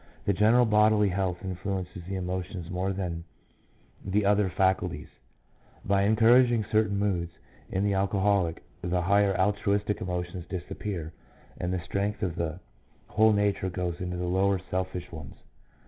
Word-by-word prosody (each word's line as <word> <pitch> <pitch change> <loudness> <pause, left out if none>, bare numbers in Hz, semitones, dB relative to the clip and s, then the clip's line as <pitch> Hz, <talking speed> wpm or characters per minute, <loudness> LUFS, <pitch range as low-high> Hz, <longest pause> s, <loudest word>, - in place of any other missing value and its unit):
The 100 - +2
general 110 +5 +4
bodily 105 -1 +4
health 95 -1 -2
influences 95 -1 -4
the 95 - -3
emotions 90 -1 -4
more 95 +2 -1
than 90 -4 -4 0.8
the 100 +2 0
other 100 -1 +3
faculties, 90 -4 0 0.8
by 100 0 +2
en 110 +2 +3
couraging 120 0 +5
certain 110 -2 +2
moods. 90 -4 -1 0.4
In 95 - -1
the 100 -1 +1
alcoholic 95 -3 +1 0.2
the 90 0 0
higher 100 0 +3
altruistic 100 +1 +1
emotions 90 -1 -4
disappear, 90 -2 -5 0.5
and 90 - -2
the 90 -1 -1
strength 100 +4 -2
of 90 -3 -1
the 85 +1 -3 0.5
whole 110 0 +4
nature 100 -2 +1
goes 90 -1 -3
into 90 -1 -3
the 90 - -2
lower 95 +2 +2
selfish 90 -1 -3
ones. 80 -5 -9
95 Hz, 145 wpm, -28 LUFS, 90-100 Hz, 0.8 s, couraging